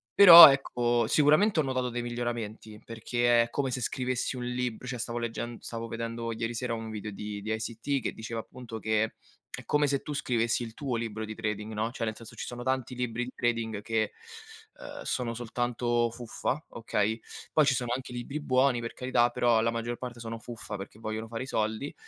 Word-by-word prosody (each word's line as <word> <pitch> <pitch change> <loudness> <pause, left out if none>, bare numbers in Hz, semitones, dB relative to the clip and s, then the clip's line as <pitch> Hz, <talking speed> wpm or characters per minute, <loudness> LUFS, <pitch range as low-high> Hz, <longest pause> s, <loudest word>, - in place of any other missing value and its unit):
Però, 170 -5 +13
ecco, 120 -3 +1
sicuramente 155 - +4
ho - - -1
notato 130 -2 -1
dei 120 0 -3
miglioramenti, 120 -3 -5
perché 120 +1 +2
è 115 - -6
come 140 -2 -1
se 125 - -3
scrivessi 125 +1 -2
un 125 - -4
libr 125 0 -3
cioè, 125 -1 -3
stavo 120 +1 -3
leggend 120 0 -4
stavo 115 0 -5
vedendo 115 0 -4
ieri 115 +1 -3
sera 120 0 -2
un 110 0 -6
video 105 -1 -5
di 105 +1 -6
di 110 +2 -4
ICT 115 +5 -2
che - - -2
diceva, 115 +1 -5
appunto, 115 -1 -9
che 110 0 +1 0.5
è - - -10
come 150 0 +2
se 140 -1 0
tu 150 - -5
scrivessi 120 -4 0
il 115 -1 -7
tuo 135 -4 -3
libro 110 -1 -4
di 110 0 -7
trading, 105 -1 -3
no, 110 +2 -1
cioè 120 -2 -3
nel 110 -1 -3
senso, 115 0 -12
ci - - -5
sono 120 0 -6
tanti 130 -1 -1
libri 125 -1 -2
di 125 - -8
trading 115 -3 -1
che, 110 0 0 0.7
uhm, - - -8
sono 120 -2 -2
soltanto 120 0 -1
fuffa, 120 +5 -3
okay, 110 -1 -1 0.3
poi 155 - +5
ci 135 - +4
sono 120 -1 -2
anche 130 -1 -7
libri 125 +5 -4
buoni, 130 -2 +3
per 115 - -5
carità, 125 -2 +2
però 120 -2 +3
la 115 +1 +1
maggior 115 +1 -3
parte 120 -2 -7
sono 115 0 -5
fuffa 110 -2 -7
perché 100 +2 -9
vogliono 110 0 -4
fare 115 +2 -5
i 130 - -8
soldi. 110 +4 -2
120 Hz, 205 wpm, -29 LUFS, 115-125 Hz, 0.7 s, Però